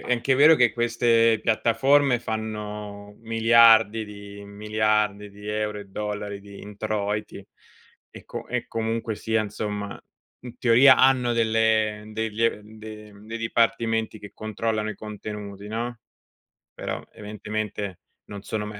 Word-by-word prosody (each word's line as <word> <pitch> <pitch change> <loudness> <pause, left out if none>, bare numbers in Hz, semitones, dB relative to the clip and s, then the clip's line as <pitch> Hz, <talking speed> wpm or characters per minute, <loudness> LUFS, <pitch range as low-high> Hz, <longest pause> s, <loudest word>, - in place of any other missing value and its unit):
È - - -3
anche 125 +2 +2
vero 150 +3 +8
che 125 -6 +3
queste 115 -1 +2
piattaforme 120 +4 +3
fanno 105 -2 -6
miliardi 115 -1 +5
di 100 -1 -11
miliardi 105 0 0
di 105 +1 -11
euro 105 0 -2
e 100 - -11
dollari 105 0 -5
di 100 0 -12
introiti 105 0 -4 0.7
e - - -13
co - - -7
e - - -3
comunque 115 -1 -2
sia, 110 0 0
insomma, 105 -1 -5 0.4
in 125 -1 -9
teoria 125 +3 +6
hanno 130 -2 +4
delle 110 -2 +1
degli 110 +1 -2
ehm, 110 -1 -3
de 105 -1 -10
mhmm, 100 +1 -16
dei 115 +1 -5
dipartimenti 115 -1 0
che 105 - -10
controllano 110 0 -3
i - - -6
contenuti, 105 -1 -8
no, 115 +3 -4 0.8
però - - -4
evidentemente 105 -2 -5 0.3
non 100 -1 -9
sono 105 +1 -4
mai 105 -1 -8
110 Hz, 135 wpm, -24 LUFS, 105-115 Hz, 0.8 s, vero